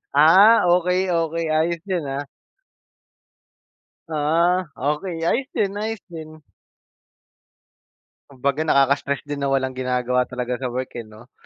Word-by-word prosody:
Ah, 190 Hz, +10 st, +7 dB
okey, 180 Hz, +1 st, 0 dB
okey 165 Hz, -1 st, -1 dB
ayos 165 Hz, +1 st, 0 dB
yun, 175 Hz, -4 st, -1 dB
ah. 140 Hz, +1 st, -4 dB, 1.8 s
Ah 165 Hz, +3 st, +1 dB
okey, 150 Hz, +5 st, -2 dB
ayos 260 Hz, +6 st, 0 dB
din, 200 Hz, -1 st, -1 dB
ayos 215 Hz, +1 st, -3 dB
din. 155 Hz, -2 st, -10 dB, 1.9 s
Kumbaga 140 Hz, +2 st, -2 dB
nakaka-stress 140 Hz, 0 st, +2 dB
din 145 Hz, -1 st, -6 dB
na 140 Hz, -, -1 dB
walang 135 Hz, -1 st, 0 dB
ginagawa 125 Hz, -1 st, -1 dB
talaga 125 Hz, 0 st, -4 dB
sa 130 Hz, -, -3 dB
work 125 Hz, +1 st, -4 dB
eh 115 Hz, -, -9 dB
'no. 110 Hz, +4 st, -16 dB
150 Hz, 120 wpm, -22 LUFS, 130-175 Hz, 1.9 s, Ah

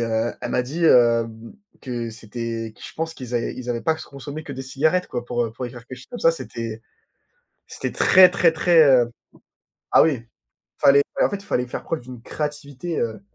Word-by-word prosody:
heu, 115 Hz, 0 st, 0 dB
elle -, -, -4 dB
m'a 125 Hz, -, +2 dB
dit, 155 Hz, +7 st, -3 dB
hem, 115 Hz, -3 st, +3 dB, 0.3 s
que 120 Hz, -3 st, -4 dB
c'était 115 Hz, 0 st, -5 dB
que 125 Hz, -, -18 dB
je -, -, -9 dB
pense 160 Hz, 0 st, -3 dB
qu'ils 125 Hz, -5 st, -8 dB
avaient 120 Hz, -, -1 dB
qu'ils 125 Hz, -1 st, -8 dB
avaient 120 Hz, -1 st, -2 dB
pas 160 Hz, -, +2 dB
qu 160 Hz, -, -9 dB
consommé 145 Hz, +3 st, -8 dB
que 145 Hz, -, -8 dB
des 135 Hz, -, -6 dB
cigarettes, 155 Hz, +7 st, +1 dB
quoi, 120 Hz, -, -4 dB
pour, 120 Hz, 0 st, -1 dB
heu, 110 Hz, -, -5 dB
pour 125 Hz, +2 st, -5 dB
écrire 120 Hz, -1 st, -11 dB
quelque 130 Hz, -, -9 dB
chose 130 Hz, -, -14 dB
comme 245 Hz, -, -7 dB
ça. 165 Hz, -, +5 dB
C'était 115 Hz, -8 st, -6 dB, 0.9 s
c'était -, -, -5 dB
très, 185 Hz, -1 st, +7 dB
très, 175 Hz, -3 st, +3 dB
très 165 Hz, 0 st, +5 dB
heu 125 Hz, -4 st, +5 dB, 0.8 s
ah, -, -, +7 dB
oui, 160 Hz, -, +3 dB
il 115 Hz, -1 st, -12 dB, 0.5 s
fallait, 140 Hz, +1 st, +6 dB
bah, -, -, +4 dB
en -, -, -5 dB
fait, 200 Hz, -, -3 dB
il 200 Hz, -, -15 dB
fallait 125 Hz, -, -1 dB
faire 120 Hz, -, -6 dB
preuve 165 Hz, -, -3 dB
d'une 125 Hz, -1 st, -11 dB
créativité, 150 Hz, +3 st, -5 dB
heu, 110 Hz, -3 st, -2 dB
125 Hz, 220 wpm, -22 LUFS, 115-155 Hz, 0.9 s, très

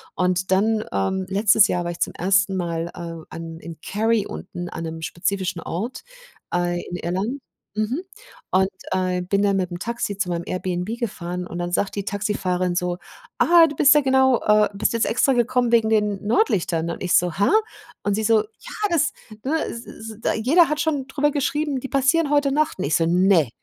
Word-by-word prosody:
Und 180 Hz, +1 st, 0 dB
dann, 215 Hz, +3 st, +2 dB
ähm, 140 Hz, -, 0 dB
letztes 205 Hz, +2 st, +4 dB
Jahr 175 Hz, -, -1 dB
war 175 Hz, -, -3 dB
ich 170 Hz, -, -9 dB
zum -, -, -1 dB
1. 190 Hz, +1 st, +2 dB
Mal, 170 Hz, -2 st, -2 dB
äh, 165 Hz, -2 st, -7 dB
an 165 Hz, 0 st, -8 dB
in 165 Hz, -2 st, -10 dB
Carry 220 Hz, 0 st, +1 dB
unten 175 Hz, -3 st, -7 dB
an 165 Hz, -, -6 dB
'nem 160 Hz, 0 st, -6 dB
spezifischen 180 Hz, +1 st, -2 dB
Ort, 220 Hz, +10 st, -5 dB, 0.5 s
äh, 175 Hz, 0 st, 0 dB
in 175 Hz, -, -5 dB
Irland. 190 Hz, +10 st, -3 dB, 0.3 s
Mhm. 215 Hz, +9 st, -1 dB, 0.5 s
Und, 190 Hz, 0 st, +3 dB, 0.2 s
äh, 185 Hz, -1 st, 0 dB
bin 200 Hz, +3 st, 0 dB
dann 200 Hz, -1 st, +2 dB
mit 185 Hz, -2 st, 0 dB
'm 175 Hz, -, -4 dB
Taxi 230 Hz, -3 st, -3 dB
zu 195 Hz, -, -1 dB
meinem 170 Hz, 0 st, -2 dB
Airbnb 185 Hz, +4 st, -3 dB
gefahren 180 Hz, -5 st, -4 dB
und 175 Hz, -1 st, -7 dB
dann 175 Hz, 0 st, -3 dB
sagt 195 Hz, +2 st, 0 dB
die 200 Hz, -, -2 dB
Taxifahrerin 185 Hz, -3 st, -1 dB
so: 180 Hz, 0 st, -1 dB, 0.4 s
„Ah, 340 Hz, -1 st, +6 dB
du 295 Hz, -, -6 dB
bist 290 Hz, +1 st, +6 dB
ja 295 Hz, -, +5 dB
genau, 265 Hz, -2 st, +3 dB
äh 210 Hz, 0 st, +4 dB
bist 200 Hz, -, 0 dB
jetzt 230 Hz, -, +1 dB
extra 265 Hz, +3 st, +2 dB
gekommen 245 Hz, 0 st, +1 dB
wegen 225 Hz, -2 st, +4 dB
den 210 Hz, -2 st, +1 dB
Nordlichtern?“ 180 Hz, -, +1 dB
Und 170 Hz, -, -5 dB
ich 180 Hz, -, 0 dB
so: 175 Hz, -1 st, +4 dB
„Hä?“ 200 Hz, -, +3 dB, 0.6 s
Und 205 Hz, -1 st, +1 dB
sie 220 Hz, -, -1 dB
so: 225 Hz, 0 st, +4 dB
„Ja 220 Hz, -, -8 dB, 0.2 s
das 310 Hz, -5 st, +1 dB, 0.3 s
ne, 315 Hz, +4 st, 0 dB
s 235 Hz, +1 st, -7 dB
s 220 Hz, -1 st, -9 dB
d -, -, 0 dB
jeder 325 Hz, +6 st, +5 dB
hat 305 Hz, +1 st, -1 dB
schon 295 Hz, -5 st, 0 dB
drüber 295 Hz, +2 st, +1 dB
geschrieben, 290 Hz, 0 st, -1 dB
die 270 Hz, -, -7 dB
passieren 285 Hz, +3 st, +2 dB
heute 290 Hz, -1 st, +3 dB
Nacht.“ 300 Hz, -6 st, 0 dB
Und -, -, -1 dB
ich 150 Hz, -, +2 dB
so: 165 Hz, -, +2 dB
„Ne.“ 175 Hz, -, +3 dB
200 Hz, 200 wpm, -22 LUFS, 180-245 Hz, 0.6 s, Ah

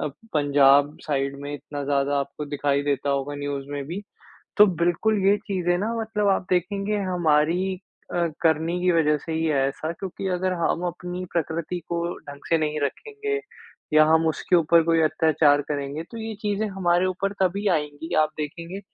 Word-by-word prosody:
अ, -, -, -1 dB, 0.3 s
Punjab 145 Hz, 0 st, +4 dB
side 140 Hz, -1 st, -1 dB
में 145 Hz, +1 st, -6 dB
इतना 145 Hz, 0 st, -6 dB
ज़्यादा 140 Hz, 0 st, +1 dB
आपको 140 Hz, +2 st, -4 dB
दिखाई 145 Hz, -1 st, 0 dB
देता 140 Hz, -1 st, 0 dB
होगा 140 Hz, +1 st, -1 dB
न्यूज़ 145 Hz, -1 st, -4 dB
में 145 Hz, -1 st, -4 dB
भी, 185 Hz, +6 st, -5 dB, 0.6 s
तो 210 Hz, -, +9 dB
बिल्कुल, 175 Hz, +4 st, +1 dB
ये 200 Hz, -, +6 dB
चीज़ें 175 Hz, -3 st, 0 dB
ना 215 Hz, +5 st, -1 dB
मतलब 215 Hz, -2 st, -1 dB
आप 190 Hz, -1 st, +2 dB
देखेंगे 200 Hz, +3 st, 0 dB
हमारी 175 Hz, +3 st, +2 dB, 0.4 s
अ, 170 Hz, -1 st, +1 dB
करनी 165 Hz, +2 st, +1 dB
की 180 Hz, 0 st, +3 dB
वजह 150 Hz, -2 st, +3 dB
से 160 Hz, -, -8 dB
ही 160 Hz, 0 st, 0 dB
है 155 Hz, -3 st, +1 dB
ऐसा, 155 Hz, +4 st, -4 dB
क्योंकि 190 Hz, +2 st, -6 dB
अगर 185 Hz, +1 st, 0 dB
हम 175 Hz, -, 0 dB
अपनी 180 Hz, +1 st, -5 dB
प्रकृति 170 Hz, +1 st, -2 dB
को 170 Hz, 0 st, -2 dB, 0.2 s
ढंग 145 Hz, 0 st, -12 dB
से 165 Hz, -, +4 dB
नहीं 155 Hz, -1 st, -1 dB
रखेंगे 425 Hz, -, -3 dB, 0.5 s
या 155 Hz, 0 st, +7 dB
हम 160 Hz, +1 st, +3 dB
उसके 170 Hz, +3 st, +1 dB
ऊपर 165 Hz, 0 st, +4 dB
कोई 165 Hz, 0 st, +3 dB
अत्याचार 155 Hz, -2 st, +3 dB
करेंगे, 145 Hz, +1 st, -3 dB
तो 230 Hz, +7 st, -11 dB
ये 225 Hz, 0 st, -5 dB
चीज़ें 210 Hz, 0 st, -1 dB
हमारे 185 Hz, -2 st, +1 dB
ऊपर 195 Hz, +2 st, -1 dB
तभी 195 Hz, +3 st, +1 dB
आएँगी। 150 Hz, +3 st, -6 dB
आप 155 Hz, -, +2 dB
देखेंगे 170 Hz, +5 st, -5 dB
165 Hz, 175 wpm, -24 LUFS, 145-185 Hz, 0.6 s, तो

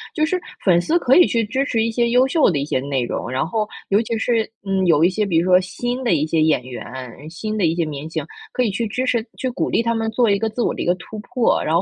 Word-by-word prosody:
就 310 Hz, -, +2 dB
是 365 Hz, +3 st, -1 dB, 0.2 s
粉 180 Hz, -3 st, +4 dB
丝 320 Hz, -, +1 dB
可 265 Hz, -4 st, +3 dB
以 355 Hz, -, +7 dB
去 230 Hz, -1 st, +1 dB
支 260 Hz, +6 st, -1 dB
持 225 Hz, -5 st, 0 dB
一 230 Hz, -, 0 dB
些 235 Hz, +1 st, +1 dB
优 250 Hz, +2 st, +4 dB
秀 300 Hz, +3 st, +3 dB
的 165 Hz, -, 0 dB
一 140 Hz, -, -1 dB
些 140 Hz, -, -1 dB
内 135 Hz, -1 st, -1 dB
容， 115 Hz, -, -4 dB
然 130 Hz, +1 st, -1 dB
后 210 Hz, +5 st, -1 dB, 0.2 s
尤 200 Hz, +2 st, +3 dB
其 230 Hz, 0 st, -3 dB
是， 225 Hz, 0 st, 0 dB, 0.2 s
嗯， 190 Hz, -1 st, 0 dB
有 160 Hz, -2 st, +4 dB
一 175 Hz, -, +5 dB
些 210 Hz, +3 st, -1 dB
比 175 Hz, -5 st, +1 dB
如 165 Hz, -, +2 dB
说 180 Hz, 0 st, +7 dB
新 245 Hz, +7 st, -4 dB
的 235 Hz, -, +2 dB
一 155 Hz, -2 st, +1 dB
些 160 Hz, 0 st, +1 dB
演 155 Hz, -5 st, +2 dB
员、 130 Hz, +3 st, -8 dB
新 215 Hz, +7 st, -4 dB
的 200 Hz, -, +2 dB
一 165 Hz, 0 st, +1 dB
些 170 Hz, -1 st, 0 dB
明 150 Hz, 0 st, -6 dB
星， -, -, -3 dB, 0.3 s
可 250 Hz, -, +1 dB
以 225 Hz, -, 0 dB
去 225 Hz, +4 st, -2 dB
支 250 Hz, +5 st, -2 dB
持、 235 Hz, -3 st, 0 dB
去 260 Hz, -, -2 dB
鼓 -, -, -2 dB
励 -, -, +1 dB
他 230 Hz, 0 st, +1 dB
们 225 Hz, -1 st, -1 dB
做 235 Hz, 0 st, +2 dB
一 200 Hz, -1 st, +2 dB
个 225 Hz, -, 0 dB
自 220 Hz, +3 st, -4 dB
我 -, -, +1 dB
的 -, -, -5 dB
一 -, -, -2 dB
个 175 Hz, -, +2 dB
突 200 Hz, +5 st, -9 dB
破。 235 Hz, +2 st, +1 dB
然 160 Hz, -, 0 dB
后 170 Hz, -, +4 dB
210 Hz, 325 characters per minute, -20 LUFS, 165-235 Hz, 0.3 s, 以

